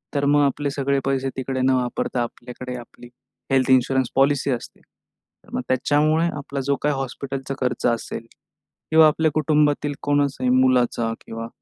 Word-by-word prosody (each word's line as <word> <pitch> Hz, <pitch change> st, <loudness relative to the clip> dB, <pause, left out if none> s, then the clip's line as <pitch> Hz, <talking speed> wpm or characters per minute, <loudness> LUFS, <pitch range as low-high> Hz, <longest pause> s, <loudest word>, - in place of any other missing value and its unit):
तर 140 Hz, 0 st, +1 dB
मग 145 Hz, +1 st, +4 dB
आपले 140 Hz, +1 st, -1 dB
सगळे 140 Hz, 0 st, 0 dB
पैसे 135 Hz, -1 st, 0 dB
तिकडे 130 Hz, 0 st, -2 dB
न 130 Hz, -, +4 dB
वापरता 125 Hz, 0 st, -1 dB
आपल्याकडे 125 Hz, +1 st, -7 dB
आपली 120 Hz, +1 st, -13 dB, 0.4 s
हेल्थ 130 Hz, -1 st, +2 dB
इन्शुरन्स 130 Hz, 0 st, +3 dB
पॉलिसी 140 Hz, 0 st, +2 dB
असते, 120 Hz, -2 st, -5 dB
तर -, -, -31 dB
मग -, -, -1 dB
त्याच्यामुळे 150 Hz, +5 st, +2 dB
आपला 140 Hz, 0 st, -5 dB
जो 140 Hz, 0 st, +2 dB
काही 150 Hz, -1 st, +2 dB
हॉस्पिटलचा 135 Hz, 0 st, -4 dB
खर्च 125 Hz, -1 st, -1 dB
असेल 115 Hz, -1 st, -2 dB, 0.7 s
किंवा 160 Hz, 0 st, +7 dB
आपल्या 155 Hz, +1 st, +2 dB
कुटुंबातील 150 Hz, -1 st, +2 dB
कोणाचाही 140 Hz, -3 st, +1 dB
मुलाचा 125 Hz, -3 st, +2 dB
किंवा 115 Hz, 0 st, -6 dB
135 Hz, 150 wpm, -22 LUFS, 125-145 Hz, 0.7 s, किंवा